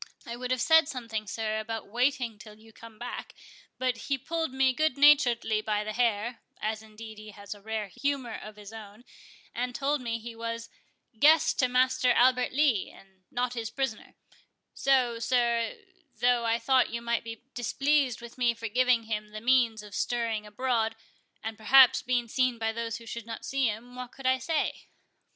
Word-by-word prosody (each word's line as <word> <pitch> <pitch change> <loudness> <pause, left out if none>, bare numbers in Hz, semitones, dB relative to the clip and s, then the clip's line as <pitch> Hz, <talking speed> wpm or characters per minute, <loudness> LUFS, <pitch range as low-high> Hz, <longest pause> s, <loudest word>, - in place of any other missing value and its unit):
I 235 - -5
would 250 +1 -5
have 255 -1 0
said 320 -2 +6
something, 230 -5 -5
sir, 220 0 -2
about 225 0 -5
waiting 245 -1 0
till 215 -1 -12
you 220 0 -18
came 225 0 -13
back, 245 +3 -7 0.4
but 255 -2 0
he 275 - +2
pulled 320 +3 -3
me 265 0 +2
goodnaturedly 275 -6 +4
by 210 -1 0
the 215 0 -4
hair, 235 0 0 0.2
(as, 215 0 -2
indeed, 220 0 -11
he 215 0 -10
has 200 -1 -8
a 205 - -16
rare 220 0 -3
humour 270 +2 -2
of 215 0 -8
his 210 0 -11
own,) 215 +1 -11 0.5
and 250 0 -3
told 285 +1 0
me, 230 -2 -2
he 230 +1 -9
was 230 0 -5 0.5
guest 310 +2 +5
to 255 - +4
Master 255 0 +2
Albert 250 0 +3
Lee, 270 -7 +2
and 190 -1 -19
not 245 0 -1
his 230 -3 -4
prisoner; 265 -5 -4 0.6
so, 255 -4 +2
sir, 235 -1 +1 0.4
though 245 -1 +2
I 230 0 +2
thought 260 +1 +3
you 235 - -3
might 235 -1 0
be 225 0 -8
displeased 270 +1 +1
with 235 +1 -11
me 240 -1 +2
for 230 0 -5
giving 250 0 +3
him 215 -1 -3
the 215 0 -7
means 235 -2 +2
of 205 -1 -12
stirring 225 -3 -1
abroad, 225 0 0 0.5
and 220 -1 -5
perhaps 260 +3 +7
being 245 -2 0
seen 255 +1 +1
by 225 0 -1
those 230 0 -4
who 230 - -9
should 235 0 -7
not 225 - -7
see 270 -2 +1
him, 225 +3 -5
what 250 -1 -7
could 270 - -12
I 260 0 +3
say?" 305 +5 -2
235 Hz, 185 wpm, -28 LUFS, 220-255 Hz, 0.6 s, perhaps